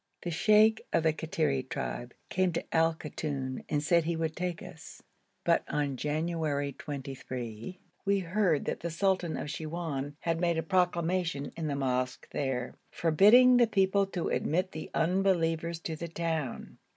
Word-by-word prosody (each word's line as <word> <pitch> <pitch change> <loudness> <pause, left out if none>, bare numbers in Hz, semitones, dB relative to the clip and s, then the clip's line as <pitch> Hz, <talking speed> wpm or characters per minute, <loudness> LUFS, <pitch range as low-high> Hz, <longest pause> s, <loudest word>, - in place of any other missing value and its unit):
The 175 - -3
sheikh 215 +5 +4
of 165 - +2
the 160 -1 +3
Kattiri 155 -4 0
tribe 120 0 -4
came 185 -1 +1
to 165 - -4
Al 165 0 +4
Koton 140 -4 -4
and 145 -1 0
said 170 +2 +3
he 170 0 0
would 160 -1 -2
take 180 -1 -3
us, - - -11 0.4
but - - +3
on 145 -2 -1
January 150 0 -1
23 130 -1 -6 0.2
we 200 0 +2
heard 180 -3 +1
that - - -2
the 170 - -3
sultan 180 -1 0
of 150 - -4
Siwoun 155 -4 -4
had 165 0 -1
made 170 -2 +2
a 160 - 0
proclamation 175 -4 0
in 165 -2 -3
the 145 - -1
mosque 130 -2 -1
there, 130 -3 -2 0.2
forbidding 215 +10 +6
the 240 -1 +5
people 195 -1 +2
to 180 -3 -3
admit 185 +5 0
the 155 - -7
unbelievers 170 -2 +1
to 160 - -4
the 170 +2 -5
town. 165 -5 -3
165 Hz, 160 wpm, -30 LUFS, 145-180 Hz, 0.4 s, forbidding